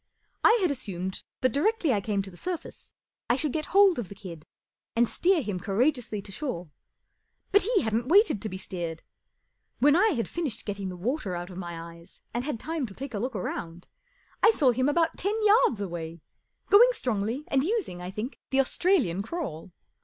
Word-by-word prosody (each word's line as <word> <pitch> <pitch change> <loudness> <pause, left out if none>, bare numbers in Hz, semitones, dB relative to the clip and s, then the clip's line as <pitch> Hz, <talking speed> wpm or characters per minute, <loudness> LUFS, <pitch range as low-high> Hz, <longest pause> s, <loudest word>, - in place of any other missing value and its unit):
I 455 - +7
had 350 - +3
assumed 190 -8 -4 0.2
that 255 -2 +2
directly 330 - +2
I 205 - +1
came 200 -1 -1
to 195 - -8
the - - -14
surface 355 - -6 0.3
I 240 - +4
should 295 0 -2
get 310 -1 -2
hold 390 -5 +5
of 215 - -5
the 200 - -9
kid 175 -6 -10 0.5
and 235 +1 +4
steer 350 +2 +2
him 200 -4 -3
courageously 215 - 0
to 195 - -9
shore. 185 - -4 0.8
But 405 - +5
lie - - +3
hadn't 225 +2 0
waited 380 - +4
to 215 - -3
be 190 - -5
steered. 170 -4 -5 0.7
When 290 +3 +5
I 395 +6 +5
had 230 -5 -1
finished 320 -9 -4
getting 200 -2 -4
the 180 - -7
water 215 - -2
out 175 +2 -5
of 180 - -9
my 170 -1 -7
eyes 170 0 -17
and 240 +1 -1
had 280 -5 -3
time 315 -2 -3
to 195 - -11
take 275 -1 -7
a 205 - -2
look 250 +2 -3
round, 175 -2 -5 0.5
I - - +7
saw 295 - +4
him 255 +3 +1
about 330 +2 +1
ten 400 +4 0
yards 410 - +5
away, 170 -4 -5 0.5
going 455 +5 +8
strongly 230 - -2
and 270 -1 +2
using, 360 - -2
I 180 - -5
think, 215 +8 -5
the 270 - +1
Australian 270 - +2
crawl. 200 - -5
235 Hz, 195 wpm, -27 LUFS, 190-310 Hz, 0.8 s, going